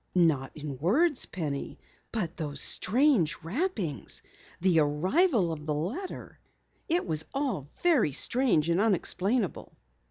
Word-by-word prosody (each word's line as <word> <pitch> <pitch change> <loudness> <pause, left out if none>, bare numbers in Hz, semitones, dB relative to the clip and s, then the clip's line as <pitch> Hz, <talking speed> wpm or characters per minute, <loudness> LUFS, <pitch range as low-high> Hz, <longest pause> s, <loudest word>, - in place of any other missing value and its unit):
"Not 155 -7 +2
in 145 -3 -6
words, 270 - +2
Penny. 150 -6 -5 0.3
But 185 -7 -3
those 145 -4 -4
strange 210 - +3
rappings, 200 - -3 0.4
the 180 -2 +3
arrival 185 - +2
of 155 -1 -7
the 150 - 0
letter 220 - -5 0.5
it 345 +2 +2
was 160 -2 0
all 265 - -2 0.2
very 310 - +3
strange 220 - +2
and 175 +4 +2
unexplainable." 205 0 0
180 Hz, 120 wpm, -28 LUFS, 155-255 Hz, 0.5 s, strange